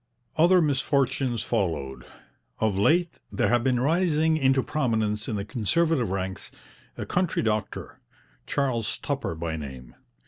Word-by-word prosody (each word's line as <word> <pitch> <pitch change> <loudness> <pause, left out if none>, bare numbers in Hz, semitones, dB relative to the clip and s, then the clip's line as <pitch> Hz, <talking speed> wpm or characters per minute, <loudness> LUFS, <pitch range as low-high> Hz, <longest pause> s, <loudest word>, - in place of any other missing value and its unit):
Other 175 +2 +5
misfortunes 135 -4 0
followed. 85 - -2 0.5
Of 110 -3 +1
late 165 - +2
there - - +1
had 120 -1 +2
been 125 -1 +2
rising 160 +2 +2
into 135 -3 +3
prominence 110 -7 0
in 110 - -1
the 100 -1 -3
Conservative 135 - +1
ranks 95 0 -4 0.5
a - - -4
country 180 -1 0
doctor, 110 -2 -3 0.5
Charles 125 -6 0
Tupper 140 - -3
by 80 0 -3
name. 65 -5 -8
120 Hz, 130 wpm, -26 LUFS, 105-150 Hz, 0.5 s, Other